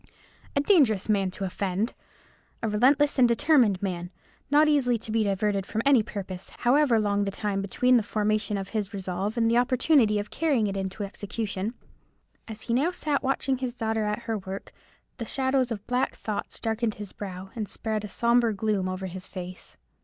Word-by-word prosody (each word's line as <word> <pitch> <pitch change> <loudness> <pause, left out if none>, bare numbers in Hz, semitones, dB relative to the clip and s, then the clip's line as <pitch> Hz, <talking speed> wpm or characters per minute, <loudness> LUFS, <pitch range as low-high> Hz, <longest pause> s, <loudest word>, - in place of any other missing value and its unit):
A - - +3
dangerous 270 - +3
man 195 -3 +2
to 190 +2 -6
offend! 195 +4 -1 0.7
A - - +1
relentless 270 +7 +3
and 245 - +7
determined 235 - +3
man; 175 -2 -3 0.4
not 300 +2 +5
easily 265 -5 +3
to 220 0 -5
be 225 0 +2
diverted 200 0 0
from 220 +1 -2
any 275 -4 +6
purpose, 195 -4 -6
however 250 -1 +3
long 205 -1 +1
the 200 - -1
time 200 0 -2
between 250 +6 +3
the - - +3
formation 210 0 0
of 195 -1 -5
his 210 -1 -3
resolve 195 +3 -3
and 230 -1 +3
the 235 +1 +4
opportunity 250 -3 +3
of 205 0 -4
carrying 285 -8 +1
it 200 -1 -2
into 195 +1 -3
execution. 205 +1 -4 0.7
As 220 -1 -7
he 235 - 0 0.2
sat 300 -5 -1
now - - -3
watching 270 -1 0
his 255 -2 -3
daughter 220 -2 -1
at 210 +3 -2
her 225 -2 -2
work, 190 +1 -7 0.5
the 230 - -3
shadows 260 0 +1
of 210 -4 -5
black 250 +1 0
thoughts 210 -2 -5
darkened 225 -1 -1
his 205 -2 -8
brow, 190 -1 -7
and 215 -3 -4
spread 220 -1 -3
a 210 - -6
sombre 235 -1 +2
gloom 200 -2 0
over 185 +1 -4
his 185 0 -6
face. 180 -1 -8
215 Hz, 185 wpm, -27 LUFS, 195-245 Hz, 0.7 s, and